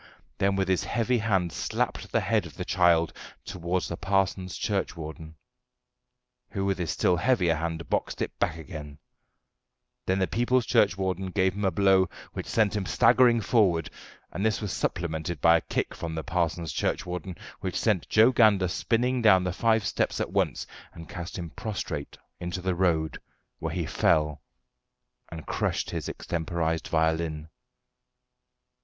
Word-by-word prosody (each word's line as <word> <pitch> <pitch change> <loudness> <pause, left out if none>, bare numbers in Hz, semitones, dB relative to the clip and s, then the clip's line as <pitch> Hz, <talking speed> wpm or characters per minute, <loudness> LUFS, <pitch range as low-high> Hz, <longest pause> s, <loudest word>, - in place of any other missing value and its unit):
then 100 0 +2
with 95 -1 0
his 95 -3 +1
heavy 120 +1 +1
hand 95 -6 0
slapped - - -2
the - - +2
head - - +1
of - - -15
the - - -4
child 85 -2 +3 0.3
towards 90 +1 -2
the 85 - -4
parson's 95 -1 0
churchwarden, 80 -5 -4 1.1
who 95 -1 -2
with 95 -1 0
his 85 -3 -2
still 90 +2 +2
heavier 90 -5 +2
hand 80 +1 -3
boxed - - -1
it - - -3
back 80 - 0
again; 75 -3 -8 1.1
then 95 - +2
the 95 - +2
people's 120 +7 +1
churchwarden 95 -1 +1
gave 95 0 +1
him 100 +2 -4
a - - +4
blow 95 0 +3 0.2
which - - -5
sent 110 -2 +2
him 105 - -1
staggering 120 -1 +5
forward, 95 -8 +2 0.4
and 95 - -4
this 110 -1 +1
was 105 -4 -4
supplemented 80 -1 -2
by 85 +2 +6
a 85 - +2
kick - - -2
from 80 -1 -5
the 80 - -3
parson's 85 -4 -1
churchwarden, 90 +5 -3 0.2
which 95 -2 -2
sent 105 -6 +1
Joe 110 +4 +6
Gander 105 -7 +4
spinning 125 +6 0
down 95 -5 +6
the 90 -1 -1
five 110 0 +2
steps 100 - -1
at - - -2
once - - 0 0.3
and 85 -1 -10
cast 85 +1 -6
him 85 -3 -6
prostrate 110 +4 -5 0.2
into 90 +1 -4
the 95 0 -1
road, 85 -3 0 0.4
where - - -3
he - - -1
fell 75 -2 +1 0.9
and 80 -2 -8
crushed - - -1
his - - -4
extemporised 80 -1 -2
violin. 80 -1 0
90 Hz, 155 wpm, -27 LUFS, 85-100 Hz, 1.1 s, by